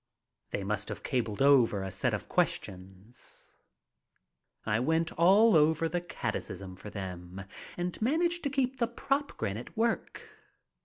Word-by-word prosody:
They 100 - -3
must 105 +1 -2
have - - -6
cabled 115 -2 -1
over 125 -8 +5
a 95 - -4
set 95 - 0
of - - -7
questions. 95 +5 -4 1.1
I 105 +1 +1
went 160 +6 +1
all 195 +6 +5
over 160 +1 +4
the 175 +2 -2
catechism 95 - -5
for 105 - -9
them 90 -1 -7 0.3
and 175 +2 -3
managed 340 +8 +1
to - - +2
keep 265 -2 -1
the 235 - +2
"prop" 275 +4 -2
grin 100 +1 -2
at 120 - -10
work. 230 0 -1
140 Hz, 145 wpm, -30 LUFS, -, 1.1 s, over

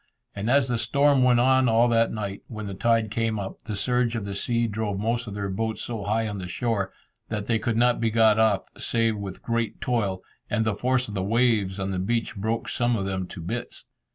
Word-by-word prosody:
And 100 +3 -2
as 135 0 +4
the 120 -2 0
storm 140 +1 +3
went 125 -1 +5
on 130 0 +4
all 115 +2 +4
that 115 0 +3
night, 100 -3 -4
when 110 -2 -6
the 100 - -5
tide 115 +2 +1
came 115 -1 0
up, 95 -1 -6
the 110 -2 -3
surge 120 +2 +1
of 110 -3 -3
the 100 - -4
sea 115 +3 0
drove 105 -2 -2
most 115 +3 -1
of 100 - -6
their 100 -1 -2
boats 110 +3 -2
so 110 -4 -4
high 110 +2 0
on 105 -2 -4
the 90 - -5
shore, 100 +1 -1 0.4
that 105 -2 -3
they 115 0 +1
could 115 +1 -1
not 120 +1 +3
be 115 - +2
got 110 -1 +4
off 110 -3 +3
save 115 -1 +1
with 95 -2 -7
great 115 -2 -1
toil, 100 -7 -1 0.3
and 110 - +1
the 110 - +1
force 125 +4 0
of 105 - -7
the 95 - -1
waves 105 -2 +1
on 95 0 -2
the 95 - -2
beach 115 +4 -1
broke 110 +3 -2
some 120 -1 +1
of 100 -3 -2
them 95 -2 -2
to 90 - -8
bits. 115 +8 -5
110 Hz, 235 wpm, -25 LUFS, 100-120 Hz, 0.4 s, went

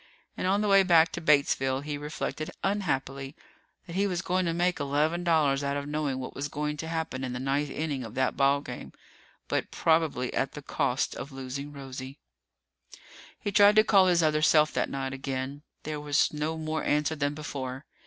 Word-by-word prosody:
And - - -2
on 200 +2 +2
the 210 - 0
way 195 -1 +6
back 170 -3 +5
to 170 - -5
Batesville, 140 -3 +2
he 150 0 -3
reflected 150 +1 -4
unhappily 140 -8 -2 0.5
that 170 - -8
he 200 +2 +2
was 180 -3 -2
going 185 0 0
to - - +1
make 175 +1 +1
eleven 150 +5 0
dollars 150 -5 +2
out 140 0 -1
of 140 - -4
knowing 150 -3 -1
what 130 -1 -6
was 140 +1 -3
going 150 0 -3
to 160 - -5
happen 160 -5 -3
in 130 -1 -3
the 125 - -4
ninth 140 +2 0
inning 145 -4 -3
of 115 -1 -9
that 130 0 +1
ball 140 +1 +3
game, - - -8 0.5
but - - -1
probably 160 -6 +1
at 135 - -1
the 150 - -8
cost 135 -2 0
of 140 - -7
losing 135 +2 -6
Rosie. 135 -1 -8 1.2
He 205 - -3
tried 205 +1 +6
to 215 - +7
call 195 -3 +5
his 175 -2 +3
other 155 -1 +2
self 155 0 +4
that - - 0
night 135 -1 -3
again. 135 +1 -4 0.2
There 155 0 -4
was 145 0 +1
no 155 +2 -2
more 155 0 -2
answer 150 +2 +1
than 145 0 -1
before. 135 -2 -5
150 Hz, 195 wpm, -28 LUFS, 135-160 Hz, 1.2 s, to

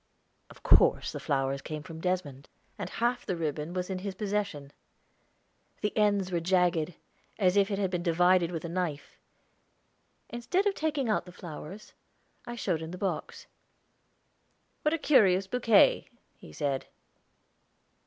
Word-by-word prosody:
Of - - -16
course - - +4
the - - -6
flowers 135 0 -1
came 155 0 -6
from 160 0 -9
Desmond, 165 -7 -3 0.3
and - - -5
half 240 +1 -1
the 185 - -2
ribbon 155 -1 -3
was 180 0 -3
in 190 -1 -3
his 195 0 -5
possession; 200 -9 -3 1.1
the 210 - -1
ends 205 -3 +2
were 175 - +1
jagged, 175 -2 +1 0.4
as 185 -3 +3
if 200 0 +4
it 200 - -1
had 195 -2 0
been 180 -2 -1
divided 175 0 +3
with 170 -2 -5
a - - -2
knife. 170 -4 -4 1.1
Instead 355 - -1
of 405 - +2
taking 300 -7 -1
out 215 - 0
the - - -9
flowers, 175 +3 -9 0.5
I 240 - -5
showed 180 -8 -1
him 160 - -6
the 180 - -7
box. 195 +1 -4 1.4
"What 300 +2 +2
a - - -2
curious 195 - +4
bouquet," 230 0 +4 0.3
he - - -14
said. 135 - -2
185 Hz, 150 wpm, -29 LUFS, 160-210 Hz, 1.4 s, course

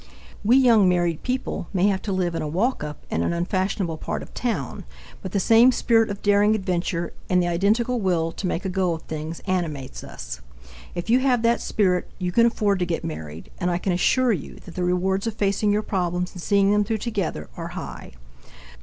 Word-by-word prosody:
We 235 +5 +5
young 230 -7 +5
married 175 -3 +1
people 250 -8 -3
may 190 0 +2
have 190 -1 0
to 205 - -4
live 180 -2 0
in - - -2
a 155 - -2
walk 200 - 0
up 150 -1 -7
in 80 - 0
an 85 - 0
unfashionable 185 -1 -1
part - - -4
of - - -14
town, 195 - -3 0.4
but 190 - -6
the 200 - +1
same 230 +5 +6
spirit 225 -2 +2
of 200 0 -6
daring 205 +1 +4
adventure 180 -3 -2 0.2
and 180 - +4
the 175 - +1
identical 220 +8 +1
will 170 -4 +1
to 185 - -4
make 180 - -2
a - - 0
go 185 -2 +1
of 160 - -10
things 155 +1 -6
animates 160 -8 -3
us. - - -8 0.5
If 175 +5 -2
you 250 - +6
have 255 -3 +2
that 235 +1 +3
spirit, 185 -4 +1
you 180 -2 -2
can 230 +5 +5
afford 205 -4 +1
to 180 - +1
get 170 -2 -2
married, 80 0 -7
and 180 - 0
I 175 - +1
can 180 +1 -1
assure 250 +8 +3
you 165 - -5
that 175 - -10
the 180 - -2
rewards 190 +3 0
of 225 - -3
facing 205 0 +1
your 210 +1 +1
problems 180 -2 -1
and 180 - -8
seeing 200 +2 +3
them 210 0 +3
through 220 +2 -1
together 200 - -3
are - - -5
high. - - -7
190 Hz, 215 wpm, -24 LUFS, 175-215 Hz, 0.5 s, same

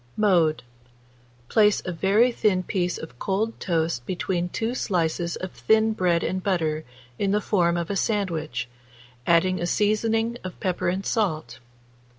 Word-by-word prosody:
Mode. 175 -9 +3 0.8
Place 210 - +3
a 185 - -2
very 200 +8 +3
thin 205 -6 +1
piece 180 -2 -1
of 160 -6 -10
cold 210 +4 -1
toast 165 -7 -1
between 180 -1 -1
2 225 +6 -2
slices 170 -6 -1
of 185 -1 -6
thin 220 0 +2
bread 175 -5 +1
and 185 0 -1
butter 160 -5 0 0.4
in 200 - +1
the 205 +2 +2
form 175 -5 +1
of 170 +2 -2
a - - -1
sandwich, 165 - -1 0.6
adding 175 +1 +3
a 175 - 0
seasoning 225 +4 +1
of 185 -1 -7
pepper 185 -2 -1
and 190 +2 -2
salt. 155 - -1
185 Hz, 150 wpm, -25 LUFS, 170-210 Hz, 0.8 s, Mode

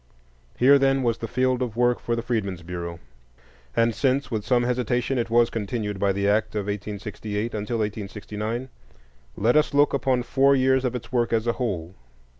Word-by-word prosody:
Here, 140 +3 +6
then, 135 0 +2
was 115 -2 0
the 115 - -4
field 130 +1 +1
of 120 -4 -2
work 120 0 +3
for 120 - -1
the 115 - -3
Freedmen's 100 -8 -2
Bureau; 85 -1 -6 0.8
and 115 0 +3
since, 135 +3 0
with 110 -3 -2
some 120 +1 +2
hesitation, 125 +1 0
it 115 -1 -2
was 120 0 +3
continued 105 -2 -3
by 100 0 +2
the 100 +1 0
act 105 +1 +1
of 105 - 0
1868 105 +2 -4
until 105 +3 -2
1869, 105 +3 -4 0.7
let 115 +6 +2
us 150 -1 +3
look 145 +1 +4
upon 130 -2 +1
four 140 +2 +3
years 130 0 +3
of 125 0 -1
its 120 0 -7
work 120 -2 +1
as 115 -1 +1
a 120 - +1
whole. 95 -9 -3
115 Hz, 185 wpm, -24 LUFS, 105-125 Hz, 0.8 s, Here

